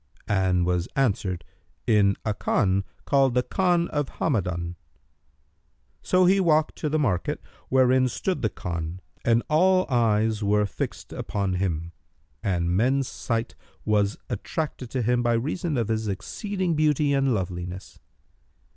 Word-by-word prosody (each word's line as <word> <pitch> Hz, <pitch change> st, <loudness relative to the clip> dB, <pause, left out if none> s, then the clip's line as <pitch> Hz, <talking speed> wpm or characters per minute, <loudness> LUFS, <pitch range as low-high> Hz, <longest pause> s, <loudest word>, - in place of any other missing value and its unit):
and 95 Hz, -3 st, +2 dB
was 90 Hz, -1 st, 0 dB
answered, 100 Hz, -9 st, 0 dB, 0.4 s
"In 100 Hz, -3 st, +4 dB
a 105 Hz, -, +1 dB
Khan 100 Hz, -1 st, +1 dB, 0.2 s
called 135 Hz, -3 st, +3 dB
the 125 Hz, -, +3 dB
Khan 175 Hz, 0 st, +1 dB
of 145 Hz, -2 st, -1 dB
Hamadбn."[FN#306] 90 Hz, -, -1 dB, 1.3 s
So 185 Hz, 0 st, +3 dB
he 190 Hz, +2 st, +5 dB
walked 155 Hz, -4 st, +2 dB
to 150 Hz, -, -2 dB
the 155 Hz, -, +1 dB
market 105 Hz, -, 0 dB, 0.3 s
wherein 130 Hz, 0 st, +4 dB
stood 180 Hz, +9 st, -2 dB
the 110 Hz, -, +1 dB
Khan, 85 Hz, -1 st, -5 dB, 0.2 s
and 115 Hz, 0 st, +3 dB
all 185 Hz, +4 st, +4 dB
eyes 110 Hz, -2 st, +2 dB
were 105 Hz, +1 st, +3 dB
fixed 100 Hz, -, -5 dB
upon 100 Hz, -2 st, -2 dB
him 85 Hz, -3 st, -2 dB, 0.5 s
and 85 Hz, -2 st, 0 dB
men's 130 Hz, +6 st, +2 dB
sight 115 Hz, 0 st, -3 dB, 0.3 s
was 105 Hz, -1 st, +2 dB
attracted 125 Hz, +2 st, -4 dB
to 130 Hz, -1 st, -1 dB
him 120 Hz, +2 st, +2 dB
by 120 Hz, -1 st, +2 dB
reason 150 Hz, +6 st, -1 dB
of 115 Hz, -3 st, 0 dB
his 110 Hz, -1 st, -1 dB
exceeding 185 Hz, -, -2 dB
beauty 150 Hz, -2 st, +2 dB
and 135 Hz, -3 st, +2 dB
loveliness. 90 Hz, -1 st, -5 dB
115 Hz, 140 wpm, -25 LUFS, 95-145 Hz, 1.3 s, he